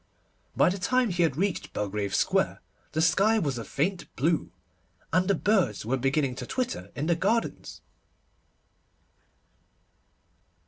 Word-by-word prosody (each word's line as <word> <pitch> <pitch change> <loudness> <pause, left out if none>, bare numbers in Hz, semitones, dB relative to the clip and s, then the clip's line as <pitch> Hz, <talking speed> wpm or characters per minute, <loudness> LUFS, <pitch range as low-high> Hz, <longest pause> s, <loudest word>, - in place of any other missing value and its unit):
By - - +5
the 190 +2 -3
time 250 +4 +2
he 175 0 0
had 160 -5 +2
reached 195 +1 -1
Belgrave 105 -1 -2
Square - - +1 0.3
the 160 +1 +1
sky 195 +7 +4
was 140 - -1
a - - -5
faint 170 +7 -2
blue, 160 +5 0 0.6
and 185 +1 +3
the 200 - +3
birds 185 - +1
were 125 +4 +1
beginning 135 +1 0
to - - -6
twitter 255 -1 -3
in 145 - -2
the 170 - +3
gardens. 210 +7 -1
170 Hz, 135 wpm, -27 LUFS, 135-200 Hz, 0.6 s, By